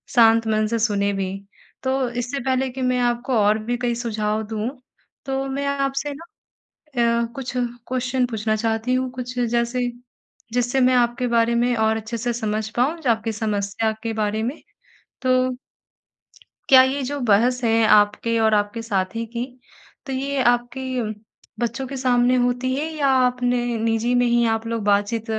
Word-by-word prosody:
शांत 225 -1 +5
मन 215 0 +1
से 230 +1 -1
सुने 200 -2 +1
भी। 190 -1 -2 0.5
तो 260 -1 0
इससे 245 +3 -3
पहले 260 0 +1
कि 260 +1 -7
मैं 255 0 +1
आपको 240 +1 0
और 210 +1 +4
भी 240 +2 -1
कई 240 -1 -1
सुझाव 220 -2 -2
दूँ। 220 +2 -2 0.6
तो 270 0 -2
मैं 280 +1 -3
आपसे 275 +1 -1
ना 330 +4 -11 1.0
अ, - - 0
कुछ 265 -2 -5
क्वेस्चन 250 +1 -1
पूछना 215 -1 -1
चाहती 225 +2 -1
हूँ। 255 0 0
कुछ 250 0 -7
जैसे 235 +1 0 0.7
जिससे 245 +2 +1
मैं 255 0 +4
आपके 245 +1 +1
बारे 235 0 +2
में 240 +1 +2
और 220 0 +2
अच्छे 225 +2 -5
से 240 +1 -2
समझ 215 -2 -2
पाऊँ, 275 +8 +1
जो 260 - 0
आपकी 225 0 -1
समस्या 210 0 -1
के 225 -1 -2
बारे 215 0 -1
में 255 +7 -3 0.6
तो 255 - -1 1.4
क्या 260 -1 +9
ये 270 +2 0
जो 285 +2 -3
बहस 245 +5 +3
है 225 0 +3
आपके 210 +2 +2
और 220 -1 +3
आपके 205 +2 0
साथी 215 +1 -2
की, 235 +2 -4 0.6
तो 270 - -4
ये 275 +1 -1
आपके 245 +2 -3 0.8
बच्चों 240 +2 -2
के 275 - -6
सामने 250 -1 +3
होती 250 +1 0
है 305 +4 -2
या 285 -3 +1 0.2
अपने 245 -1 0
निजी 225 +2 +1
में 245 - +3
ही 235 0 +3
आप 225 +1 -10
लोग 230 -2 -2
बातचीत 205 +2 +1
240 Hz, 170 wpm, -22 LUFS, 220-255 Hz, 1.4 s, क्या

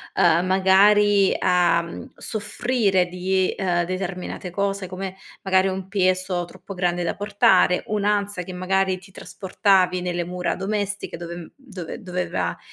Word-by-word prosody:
uhm, 170 0 +4
magari, 195 +1 +4
a 175 -2 +2 0.3
soffrire 210 -3 0
di, 185 +1 0
uhm, 175 -3 0
determinate 185 0 -5
cose 195 0 -2
come, 185 +1 -6 0.3
magari, 190 0 +3
un 190 0 -4
peso 185 -2 0
troppo 185 +3 -11
grande 175 -1 -1
da 170 - -2
portare, 205 -3 +3
un'ansa 205 -2 0
che 180 - -8
magari 190 +1 0
ti 190 +1 -16
trasportavi 185 -1 +1
nelle 175 -1 -2
mura 180 0 -2
domestiche 205 -2 -3
dove 170 0 -8
dove 200 - -9
doveva 175 - -3
185 Hz, 125 wpm, -23 LUFS, 180-200 Hz, 0.3 s, uhm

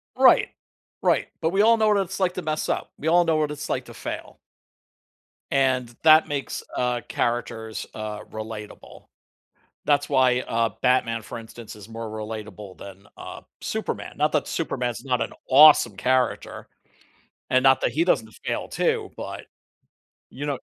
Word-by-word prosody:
Right. - - +5 0.5
Right, - - +2
but 160 - +2
we 195 +3 +2
all 230 +2 +6
know 220 -1 +2
what 210 - +4
it's 195 -1 -2
like 180 -1 +2
to 185 - -3
mess 155 -1 -2
up. - - -2
We 160 - -1
all 175 +1 +5
know 160 -1 +2
what 150 -1 0
it's 150 0 -6
like - - -1
to - - -12
fail. - - -7 1.1
And 130 -3 +2
that 155 0 +7
makes, 140 -2 -4
uh, 125 -1 0
characters, 115 -2 -2
uh, 105 -1 -5
relatable. 110 -1 -9 0.8
That's 145 -1 +2
why, 130 -3 +3
uh, 115 -2 0
Batman, 115 -3 +2
for 115 +3 -8
instance, 115 -1 -10
is 105 +1 -12
more 115 0 -6
relatable 105 -3 -7
than, 100 0 -11
uh, - - -9 0.2
Superman. - - -4
Not - - +1
that - - 0
Superman's 120 0 -3
not 125 -3 0
an 115 - -4 0.2
awesome 145 -7 +7
character, 130 +5 -1 0.8
and 130 - +4
not 135 -1 +5
that - - +1
he 155 +6 +1
doesn't 110 -11 +1
fail - - -2
too, - - -1
but - - -7 0.8
you 140 - -7
know 140 -3 -2
125 Hz, 160 wpm, -24 LUFS, 110-150 Hz, 1.1 s, that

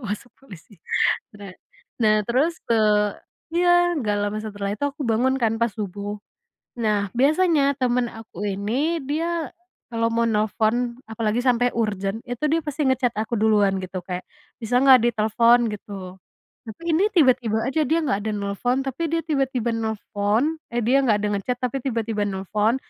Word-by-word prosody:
Masuk 210 +4 -5
polisi. 205 -6 -15 0.6
bene 200 -3 -10 0.5
nah, 215 -1 +4
terus 280 +8 +2
tuh, 210 -2 +3 0.4
eee 345 - +1
iya, 355 - +3 0.3
nggak 210 -4 0
lama 205 +1 -2
setelah 205 -2 -4
itu 210 - -5
aku 295 - -10
bangun 245 +4 +2
kan 225 -1 +2
pas 235 - +3
subuh. 205 0 -5 0.6
Nah, 210 -2 +1
biasanya 300 0 +3
temen 250 -1 +1
aku 225 -5 -13
ini, 250 - -1
dia 330 0 -1 0.4
kalau 230 0 +1
mau 235 0 +2
nelpon 225 +3 0
apalagi 220 +1 -1
sampai 245 -1 +2
urgent 205 -2 -1
itu 245 +3 -6
dia 325 - +3
pasti 295 0 -2
nge-chat 255 -2 +1
aku 220 +3 -3
duluan 205 -3 +3
gitu, 185 0 -5
kayak, 180 -1 -4 0.4
"Bisa 230 +2 -1
nggak, 260 -2 +8
ditelepon?" 230 +2 +3
Gitu. 205 0 -9 0.7
Tapi 220 +10 -10
ini 325 +5 +3
tiba-tiba 255 -8 +3
aja, 310 +4 0
dia 325 +2 +2
nggak 205 -9 0
ada 220 - -2
nelpon, 205 +5 -1
tapi 270 +5 -3
dia 330 - +1
tiba-tiba 265 -6 0
nelpon 220 +6 -1
ehdia 240 +3 +2
nggak 215 -3 +4
ada 210 - +1
nge-chat 245 +5 -3
tapi 260 +2 -1
tiba-tiba 225 -4 -1
nelpon, 205 +4 0
230 Hz, 155 wpm, -23 LUFS, 210-260 Hz, 0.7 s, nggak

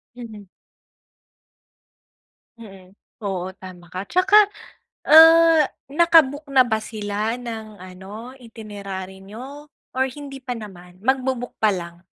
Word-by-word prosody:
Mhm. 220 -5 -11 2.1
Mm. 195 -4 -14 0.3
Oo 185 -2 -3
tama 180 -2 -13
ka. 185 +4 -6
'Tsaka, 375 - +3 0.7
ah, 325 0 +8 0.2
naka-book 310 -2 +3
na 265 -1 +6
ba 220 -2 0
sila 215 0 -3
ng 220 -4 -8
ano, 200 +7 -10
itinerary 200 -5 -9
niyo 270 +9 -11 0.3
or 260 - +2
hindi 280 -1 -9
pa 250 - -4
naman? 180 -4 -12
Mag-bo-book 260 0 -1
pa 215 -1 +4
lang? 170 0 -8
220 Hz, 110 wpm, -22 LUFS, 190-270 Hz, 2.1 s, ah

